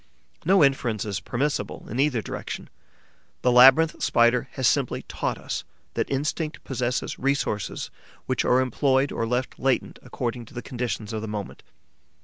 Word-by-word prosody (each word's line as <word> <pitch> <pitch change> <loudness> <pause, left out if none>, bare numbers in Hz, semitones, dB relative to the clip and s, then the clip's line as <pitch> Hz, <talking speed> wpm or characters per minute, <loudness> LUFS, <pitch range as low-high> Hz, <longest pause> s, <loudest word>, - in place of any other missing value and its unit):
No 190 -1 +5
inference 120 -7 +1
is 100 -2 -2
permissible 140 +4 -2
in 120 - -4
either 135 -6 +2
direction. - - -6 0.7
The 125 - +4
Labyrinth 135 +6 +7
Spider 120 +1 +3
has 130 -2 +1
simply 140 -4 +1
taught - - -3
us - - -4 0.3
that - - -1
instinct 150 +3 -2
possesses 125 -1 -2
resources 135 -6 -1 0.3
which - - 0
are 125 +1 +4
employed 135 +2 +2
or 115 - -2
left 125 +2 -2
latent 135 -1 0
according 120 -1 -4
to 110 - -16
the 120 - -5
conditions 120 -4 -4
of 110 - -2
the 110 - -5
moment. 105 -2 -5
125 Hz, 150 wpm, -25 LUFS, 120-135 Hz, 0.7 s, Labyrinth